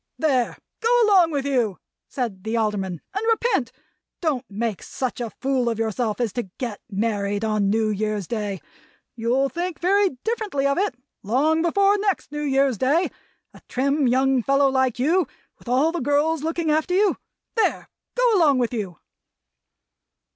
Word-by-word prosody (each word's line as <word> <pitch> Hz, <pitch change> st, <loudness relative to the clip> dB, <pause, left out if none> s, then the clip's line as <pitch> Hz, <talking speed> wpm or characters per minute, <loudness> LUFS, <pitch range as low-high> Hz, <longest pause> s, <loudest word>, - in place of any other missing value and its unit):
"There! 265 Hz, -6 st, +1 dB, 0.2 s
Go 455 Hz, -, 0 dB, 0.2 s
along 380 Hz, -5 st, +5 dB
with 285 Hz, -3 st, -2 dB
you," 245 Hz, -8 st, +1 dB, 0.3 s
said 225 Hz, -8 st, -4 dB
the 220 Hz, +1 st, -1 dB
Alderman, 195 Hz, -6 st, -1 dB
"and 415 Hz, +3 st, -2 dB
repent. 450 Hz, -, +1 dB, 0.5 s
Don't 300 Hz, -8 st, -1 dB
make 215 Hz, -1 st, -3 dB
such 255 Hz, -2 st, -4 dB
a 235 Hz, -, -2 dB
fool 260 Hz, +1 st, -1 dB
of 230 Hz, -, -2 dB
yourself 225 Hz, 0 st, -1 dB
as 230 Hz, -5 st, -1 dB
to 240 Hz, -6 st, -4 dB
get 235 Hz, -5 st, -4 dB
married 205 Hz, 0 st, -1 dB
on 215 Hz, -2 st, +1 dB
New 220 Hz, +1 st, +2 dB
Year's 210 Hz, -1 st, -2 dB
Day. 205 Hz, -2 st, -3 dB, 0.5 s
You'll 245 Hz, +4 st, +1 dB
think 345 Hz, +3 st, -4 dB
very 385 Hz, -4 st, +2 dB
differently 435 Hz, -, -1 dB
of 280 Hz, +4 st, +2 dB
it, 390 Hz, -10 st, 0 dB, 0.3 s
long 290 Hz, +10 st, +2 dB
before 395 Hz, +4 st, +3 dB
next 395 Hz, -7 st, -1 dB
New 295 Hz, 0 st, -4 dB
Year's 270 Hz, -5 st, +1 dB
Day: 300 Hz, +8 st, +2 dB, 0.4 s
a -, -, -15 dB
trim 275 Hz, +2 st, +1 dB
young 260 Hz, +1 st, +3 dB
fellow 275 Hz, +3 st, +3 dB
like 260 Hz, -2 st, +1 dB
you, 320 Hz, +6 st, +2 dB, 0.3 s
with -, -, -19 dB
all 265 Hz, +7 st, +3 dB
the 345 Hz, -, -3 dB
girls 290 Hz, +3 st, +1 dB
looking 325 Hz, 0 st, -1 dB
after 315 Hz, +4 st, +1 dB
you. 405 Hz, +1 st, +3 dB, 0.4 s
There! 450 Hz, -, 0 dB, 0.3 s
Go -, -, +4 dB
along 300 Hz, -6 st, +4 dB
with 245 Hz, -1 st, 0 dB
you!" 195 Hz, -7 st, -4 dB
265 Hz, 160 wpm, -23 LUFS, 225-325 Hz, 0.5 s, along